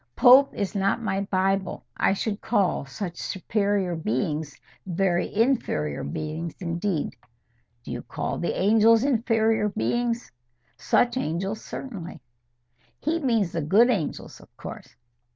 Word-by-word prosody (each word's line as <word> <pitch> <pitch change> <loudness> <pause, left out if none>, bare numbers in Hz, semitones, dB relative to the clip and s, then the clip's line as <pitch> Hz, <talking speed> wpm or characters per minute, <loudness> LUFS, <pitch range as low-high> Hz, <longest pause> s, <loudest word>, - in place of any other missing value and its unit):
Pope 265 +2 +7
is 200 -2 -2
not 195 +2 +1
my 200 -4 -1
Bible. 190 0 0
I - - +2
should 205 +1 -3
call 200 - +1
such 170 +5 -6
superior 200 -1 -1
beings 150 +2 -2 0.3
very 180 -1 0
inferior 205 - 0
beings 155 - -4
indeed." 170 -1 -2 0.7
"Do - - -8
you 120 0 -4
call - - -4
the 170 - -2
angels 225 +3 +5
inferior 225 -4 +2
beings?" 235 +3 -1 0.4
"Such 245 +1 +2
angels, 195 +2 -2
certainly." 195 -10 -7 0.8
"He 330 +2 0
means 230 - +1
the 165 - -2
good 210 +11 +5
angels, 185 -10 -3
of - - -17
course." - - -9
195 Hz, 125 wpm, -25 LUFS, 170-225 Hz, 0.8 s, Pope